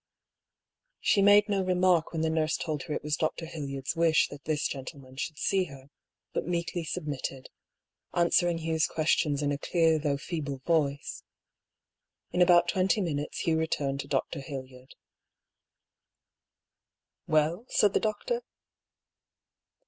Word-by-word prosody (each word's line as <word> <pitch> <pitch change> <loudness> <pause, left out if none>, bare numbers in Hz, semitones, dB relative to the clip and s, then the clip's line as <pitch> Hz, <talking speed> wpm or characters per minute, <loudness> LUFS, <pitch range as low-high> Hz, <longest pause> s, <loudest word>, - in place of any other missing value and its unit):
She 200 - +3
made 205 +1 +6
no 200 -2 +1
remark 180 -2 +2
when 160 - -2
the 160 - +2
nurse 160 0 +1
told 155 -3 -3
her 150 - -5
it - - -4
was 150 0 0
Dr. 160 +1 -2
Hildyard's 140 -4 -4
wish 165 -1 +3
that 145 -1 -11
this 155 -1 0
gentleman 130 -1 -8
should 150 +3 -4
see 190 +2 +1
her, 140 -3 -13 0.4
but - - -2
meekly 170 0 -2
submitted, 145 -5 -5 0.6
answering 175 0 +2
Hugh's 160 -1 0
questions 155 -2 +1
in 145 - +1
a 140 - -2
clear 165 0 +2
though 145 -2 0
feeble 145 -3 -4
voice. 145 -4 0 1.1
In 180 - +1
about 175 -1 +6
twenty 190 +4 +2
min 165 -7 -1
utes 145 - -5
Hugh 160 -1 +1
returned 140 -4 -1
to 140 - -5
Dr. - - -1
Hildyard. 130 -2 -9 1.0
« - - -62
Well? 155 +9 +1
" - - -35
said 205 -2 +5
the - - +3
doctor. 350 - -1
160 Hz, 145 wpm, -29 LUFS, 145-175 Hz, 1.1 s, made